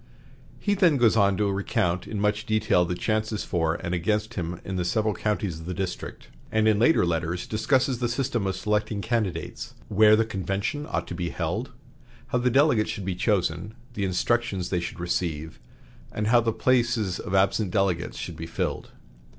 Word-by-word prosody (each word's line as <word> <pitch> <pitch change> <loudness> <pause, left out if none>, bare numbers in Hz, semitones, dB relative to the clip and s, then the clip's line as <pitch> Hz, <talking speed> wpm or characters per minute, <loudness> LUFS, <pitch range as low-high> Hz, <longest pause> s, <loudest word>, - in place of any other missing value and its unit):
He 205 - +1
then 180 -7 +4
goes 115 -3 +4
on 100 -3 +3
to 105 -1 +1
recount 95 -2 -1
in 105 - -4
much 105 +1 0
detail 110 -5 +3
the 90 +1 -2
chances 110 +1 -1
for 80 -2 0
and 85 - -4
against 105 +6 0
him 85 -4 -4
in 95 - -4
the 90 - 0
several 110 +4 +1
counties 100 -4 -2
of 80 - -9
the 90 - -3
district, 95 0 -5 0.2
and 110 0 +2
in 105 -2 +4
later 120 - +4
letters 85 +1 -1
discusses 125 +3 +1
the 120 -1 0
system 120 -4 -1
of 95 - -1
selecting 105 +1 -1
candidates, 100 -9 -2
where 110 +1 +6
the 115 +1 +2
convention 100 - -3
ought - - -1
to - - -5
be 85 0 -3
held, - - -3 0.6
how 125 - +1
the 125 +1 +2
delegates 135 -4 +3
should 100 - -4
be 95 - -1
chosen, 95 +1 0 0.2
the 105 - -3
instructions 95 0 0
they 90 - +1
should 85 0 -6
receive, 80 -3 -2 0.5
and 105 - -2
how 120 0 +6
the 115 0 +1
places 115 -4 +1
of 100 -1 -3
absent 100 +1 +2
delegates 90 -4 0
should - - -5
be 80 - -6
filled. 80 - -3
105 Hz, 185 wpm, -26 LUFS, 90-110 Hz, 0.6 s, where